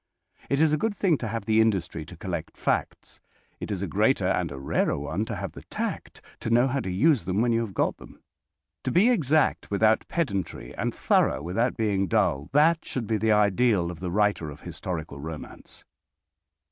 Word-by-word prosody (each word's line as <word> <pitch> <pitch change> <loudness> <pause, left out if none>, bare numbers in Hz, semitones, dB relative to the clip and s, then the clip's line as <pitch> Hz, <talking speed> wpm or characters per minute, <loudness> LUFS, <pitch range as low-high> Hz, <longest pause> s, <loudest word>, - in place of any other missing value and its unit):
It 140 - +1
is 155 -1 +4
a 155 - +1
good 220 +2 -1
thing 175 -8 +2
to 115 - -3
have 115 +1 -4
the 110 0 +4
industry 90 -8 -1
to 90 - -11
collect 85 -2 -5
facts. - - -2 0.4
It - - -6
is 100 -1 -2
a - - -2
greater 105 +3 +2
and 90 -4 0
a 70 - -6
rarer 70 - 0
one 75 +9 -2
to - - -4
have - - -5
the - - -11
tact - - -5 0.2
to - - -4
know 120 +2 +4
how 135 +1 -1
to 95 - -4
use 130 - +2
them 95 +2 0
when 120 +1 +2
you 115 - +2
have 110 -5 -5
got - - 0
them. - - -14 0.7
To - - +1
be 205 +8 +5
exact 155 - +2
without 110 +2 +2
pedantry, 100 - -3
and - - -1
thorough 70 +3 +1
without 115 +9 0
being 100 -4 +1
dull, 70 -3 +1
that 160 +4 +4
should 125 -3 -4
be 110 0 0
the 110 +1 +1
ideal 105 -3 +2
of 85 - -10
the 90 - -4
writer 100 -4 +1
of 75 0 -11
historical 80 -5 -6
romance. 80 +1 -9
105 Hz, 200 wpm, -26 LUFS, 90-125 Hz, 0.7 s, be